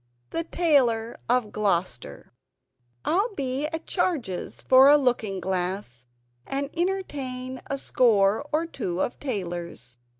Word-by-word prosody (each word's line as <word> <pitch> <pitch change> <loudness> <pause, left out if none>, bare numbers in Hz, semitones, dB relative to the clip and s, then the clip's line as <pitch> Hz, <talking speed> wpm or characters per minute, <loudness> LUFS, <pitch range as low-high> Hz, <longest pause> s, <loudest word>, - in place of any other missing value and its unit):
THE 330 - -1
TAILOR 255 -10 +2
OF 240 -4 +2
GLOUCESTER 180 - -2 0.7
"I'll 400 +6 +1
be 270 0 -1
at 325 +1 -5
charges 290 - -2
for 265 +1 +7
a 295 - +8
looking 235 -8 0
glass; 180 -9 -3 0.4
And 280 +1 -2
entertain 275 -9 -3
a 275 - -1
score 220 -5 +3
or 315 +2 +1
two 185 - -4
of 240 - -2
tailors." 175 - -5
250 Hz, 120 wpm, -26 LUFS, 195-290 Hz, 0.7 s, a